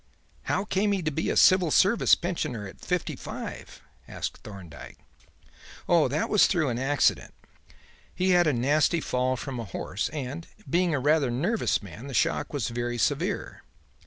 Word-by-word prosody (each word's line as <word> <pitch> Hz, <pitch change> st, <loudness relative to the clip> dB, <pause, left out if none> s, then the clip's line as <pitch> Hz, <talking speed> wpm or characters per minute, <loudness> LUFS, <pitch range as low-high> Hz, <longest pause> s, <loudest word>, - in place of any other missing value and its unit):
"How 190 Hz, -, 0 dB
came 205 Hz, 0 st, +1 dB
he 190 Hz, -3 st, -1 dB
to 155 Hz, -, -1 dB
be 160 Hz, +3 st, -2 dB
a -, -, 0 dB
civil 185 Hz, -3 st, +5 dB
service 200 Hz, +9 st, +4 dB
pensioner 145 Hz, -, -3 dB
at 95 Hz, -, -11 dB
fifty -, -, -2 dB
five?" -, -, -8 dB, 0.2 s
asked -, -, -5 dB
Thorndyke. 95 Hz, -7 st, -11 dB, 0.9 s
"Oh, 170 Hz, -4 st, +4 dB
that 145 Hz, +5 st, -1 dB
was 210 Hz, -, +5 dB
through 160 Hz, -7 st, +1 dB
an 120 Hz, 0 st, -2 dB
accident. 135 Hz, +1 st, +1 dB, 0.8 s
He 185 Hz, +1 st, +1 dB
had 175 Hz, -2 st, +4 dB
a -, -, +4 dB
nasty 145 Hz, +7 st, +2 dB
fall 130 Hz, -3 st, -1 dB
from 130 Hz, -1 st, -5 dB
a -, -, -3 dB
horse, 95 Hz, +2 st, -4 dB
and, 145 Hz, +2 st, -6 dB, 0.2 s
being 175 Hz, -1 st, +1 dB
a -, -, 0 dB
rather 145 Hz, 0 st, +2 dB
nervous 140 Hz, -, 0 dB
man, 100 Hz, -, -10 dB
the 135 Hz, -, -6 dB
shock 165 Hz, -, 0 dB
was 140 Hz, -7 st, -2 dB
very 120 Hz, 0 st, -3 dB
severe. -, -, -1 dB
145 Hz, 165 wpm, -27 LUFS, 120-175 Hz, 0.9 s, civil